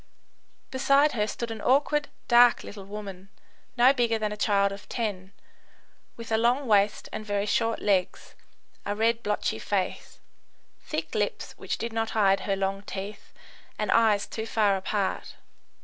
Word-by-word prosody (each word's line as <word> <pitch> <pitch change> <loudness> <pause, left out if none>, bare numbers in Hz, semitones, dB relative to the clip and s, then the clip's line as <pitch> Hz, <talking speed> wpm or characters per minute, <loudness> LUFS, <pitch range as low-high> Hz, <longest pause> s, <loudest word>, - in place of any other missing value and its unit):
Beside 275 +3 +3
her 210 -3 -1
stood 235 +1 -4
an 220 -2 -6
awkward, 290 +2 +2 0.2
dark 240 0 +6
little 200 -2 -9
woman, 195 -2 -8 0.5
no 250 +3 +6
bigger 235 -4 +1
than 215 -1 -2
a - - -3
child 200 -1 +2
of 200 +1 -10
ten, 200 -5 -3 0.9
with 230 -1 -9
a 220 - +3
long 245 +4 +2
waist 205 -2 +2
and - - -4
very 205 -1 -1
short 225 +2 0
legs, 190 -3 0 0.5
a 205 - -2
red, 225 +2 +1
blotchy 205 - -1
face, 190 - -3 0.6
thick - - -5
lips - - -2
which - - -4
did 230 0 -4
not 225 0 -1
hide 195 -2 +4
her 195 - -1
long 195 0 -2
teeth, 200 +1 -8 0.5
and 210 -2 -1
eyes 215 -3 +3
too 220 0 -6
far 210 -3 +2
apart. 195 +1 -2
210 Hz, 155 wpm, -27 LUFS, 200-230 Hz, 0.9 s, dark